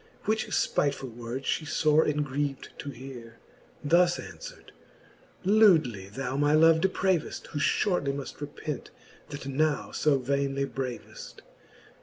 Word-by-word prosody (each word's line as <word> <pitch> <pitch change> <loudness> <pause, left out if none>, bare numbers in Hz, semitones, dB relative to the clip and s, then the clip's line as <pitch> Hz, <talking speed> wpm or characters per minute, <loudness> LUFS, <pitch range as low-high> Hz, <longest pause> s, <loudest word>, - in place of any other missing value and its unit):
Which 220 +1 0
fpitefuU 135 -4 0
words 120 +3 -6
fhe 155 - -1 0.2
fore 155 +1 +5
engriev'd 145 -2 -2
to 145 - -5
heare, 120 -3 -10 0.5
Thus 175 +3 +4
anfvverd; - - -10 0.7
Lewdly 160 - +4
thou 135 +4 -4
my 145 +1 +2
love 160 +1 +6
depraveft, 190 -3 0
Who 150 - -4
Ihortly 175 -3 +1
muft 140 +1 -7
repent, 145 -1 -5 0.4
that 145 -1 -7
now 145 +2 0
fo 150 -2 +2
vainely 140 +1 -1
braveft. 130 -3 -7
145 Hz, 120 wpm, -28 LUFS, 135-160 Hz, 0.7 s, love